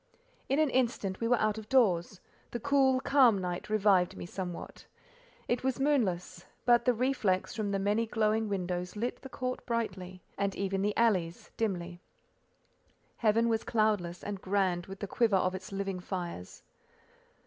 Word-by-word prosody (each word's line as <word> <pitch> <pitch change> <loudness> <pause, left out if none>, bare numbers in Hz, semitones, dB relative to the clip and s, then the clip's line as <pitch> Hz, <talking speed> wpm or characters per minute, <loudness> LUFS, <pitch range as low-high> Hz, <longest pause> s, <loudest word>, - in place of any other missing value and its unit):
In 275 - +2
an 310 -3 +3
instant 235 -7 0
we 230 - 0
were 245 +1 +4
out 215 0 +1
of 215 - -12
doors: 195 -8 +2 0.3
the 240 - -4
cool, 270 0 +3
calm 260 -6 +5
night 180 0 -4
revived 200 -4 +3
me - - -6
somewhat. 180 -1 -7 0.6
It 240 +1 0
was 265 0 0
moonless, 185 -11 0 0.2
but 240 -1 +4
the 250 - +4
reflex 230 -6 0
from 215 -3 -2
the 200 - 0
many 205 +4 +1
glowing 220 0 +1
windows 180 -1 -3
lit 235 +4 -3
the 265 - -9
court 255 -1 -4
brightly, 185 -6 -3 0.2
and 200 -1 0
even 195 -1 -1
the 205 +1 0
alleys—dimly. 180 -3 -1 1.2
Heaven 230 +1 +3
was 225 -1 +1
cloudless, 210 -6 0
and 200 -2 -5
grand 185 -3 0
with 195 0 -9
the 200 - -3
quiver 220 0 +2
of 185 0 +1
its 185 +1 -7
living 195 -1 -3
fires. 175 - -6
205 Hz, 160 wpm, -30 LUFS, 185-235 Hz, 1.2 s, calm